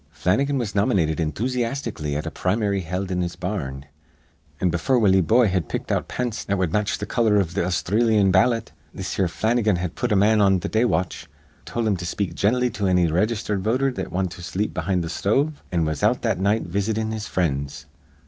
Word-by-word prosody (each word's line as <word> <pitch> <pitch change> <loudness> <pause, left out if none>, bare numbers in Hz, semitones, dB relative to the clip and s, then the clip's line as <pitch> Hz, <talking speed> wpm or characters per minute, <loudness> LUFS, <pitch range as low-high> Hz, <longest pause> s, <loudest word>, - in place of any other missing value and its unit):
Flannigan 135 - 0
was 115 -5 -2
nomynated 90 -6 +1
enthusyastically 115 - -2
at 75 - -3
a 80 - -4
prim'ry 100 +2 0
held 90 +3 -4
in 90 0 0
his 85 -1 -3
bar 90 -3 -3
rn; 70 +1 -9 0.7
an' 90 - +1
befure 90 +10 +1
Willie 95 -4 +4
Boye 115 +8 +4
had 90 -6 -1
picked - - -4
out - - 0
pants 120 -3 -3
that 100 - -1
wud 90 -4 0
match 105 0 0
th' - - -5
color 110 -3 +2
iv 90 -4 -1
th' - - -10
Austhreelyan 100 +3 +2
ballot 115 +5 +2 0.2
this - - -4
here 95 - +2
Flannigan 110 +3 +1
had 90 -1 -3
put - - -2
a - - +4
man 105 +2 +4
on 95 -2 +4
th' - - -5
day 110 +2 +3
watch, 90 -6 -1 0.4
tol' 120 -1 -2
him 105 -3 +1
to 90 - -6
speak 100 +1 -2
gently 125 +4 +1
to 100 - -2
anny 90 -1 +3
raygistered 105 +4 0
voter 130 +6 +1
that - - -5
wint 95 -1 -1
to 85 - -9
sleep 100 +5 -2
behind 90 -3 -1
th' 80 - -4
sthove, 135 +13 +1 0.2
an' 85 -2 +1
was 75 -2 -2
out - - +2
that - - 0
night 100 +3 +1
visitin' 110 +4 -1
his 110 0 -4
frinds. 70 -6 -2
100 Hz, 210 wpm, -23 LUFS, 90-110 Hz, 0.7 s, Willie